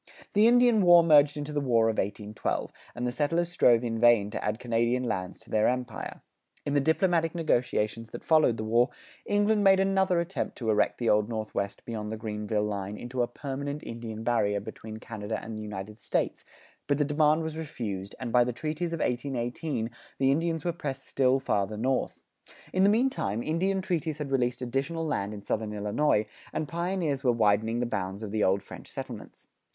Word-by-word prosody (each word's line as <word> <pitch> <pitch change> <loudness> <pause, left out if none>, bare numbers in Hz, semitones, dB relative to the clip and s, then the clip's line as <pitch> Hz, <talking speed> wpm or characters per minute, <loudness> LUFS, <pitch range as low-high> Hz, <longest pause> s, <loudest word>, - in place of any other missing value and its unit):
The 210 +2 +6
Indian 240 -2 +5
war 175 -2 +7
merged 150 -2 +5
into 145 +1 -4
the 145 - 0
War 115 -4 +3
of 110 - 0
1812, 105 +1 -3 0.2
and 120 - -3
the 125 - 0
settlers 165 +6 0
strove 120 -9 +4
in 115 -2 -2
vain 115 -4 +5
to - - -4
add 105 +1 -1
Canadian 120 +1 0
lands 95 -6 -3
to - - -17
their 110 0 +3
empire. 125 -3 -3 0.4
In 145 - -1
the 145 - +4
diplomatic 165 +2 +2
negotiations 115 -8 0
that - - -8
followed 155 -8 +4
the 110 - -3
war, 120 +4 +3 0.4
England 205 +1 +2
made 195 -1 +6
another 190 -2 +2
attempt 170 +3 -3
to 115 -3 0
erect 105 - +2
the 120 - -2
Old 105 0 +3
Northwest 110 -3 -3
beyond 110 -2 -4
the 110 - -4
Greenville 105 -1 -2
line 100 -1 -3
into 125 +1 -3
a 120 - +2
permanent 140 +3 -5
Indian 115 -1 -6
barrier 105 -4 +1
between 110 +1 -8
Canada 110 -1 -5
and 110 0 -7
the 110 - -5
United 105 +1 -7
States; - - -1 0.4
but 145 -1 +2
the 145 - +2
demand 150 +2 +3
was 160 -1 -4
refused, 110 -12 -5
and 125 -3 -4
by 125 0 +5
the 125 - -1
treaties 155 +6 -3
of 165 - -3
1818, 125 0 -2 0.3
the 135 0 +3
Indians 165 +2 0
were 175 - 0
pressed 135 -5 -5
still 130 0 +2
farther 105 -5 -1
north. 130 +4 -1 0.5
In 185 - +3
the 200 - +6
meantime, 205 - +1
Indian 190 +4 0
treaties 165 -5 -1
had 150 -3 -5
released 125 -1 0
additional 140 +7 -2
land 100 -9 -1
in 105 -1 -8
southern 110 -1 -2
Illinois, 105 +2 +1 0.3
and 155 - -2
pioneers 170 -4 -1
were 125 - +4
widening 110 0 +2
the - - +1
bounds 100 -2 -3
of 105 - -5
the 110 0 +1
old 95 +1 +2
French - - -11
settlements. - - -8
125 Hz, 190 wpm, -28 LUFS, 110-155 Hz, 0.5 s, war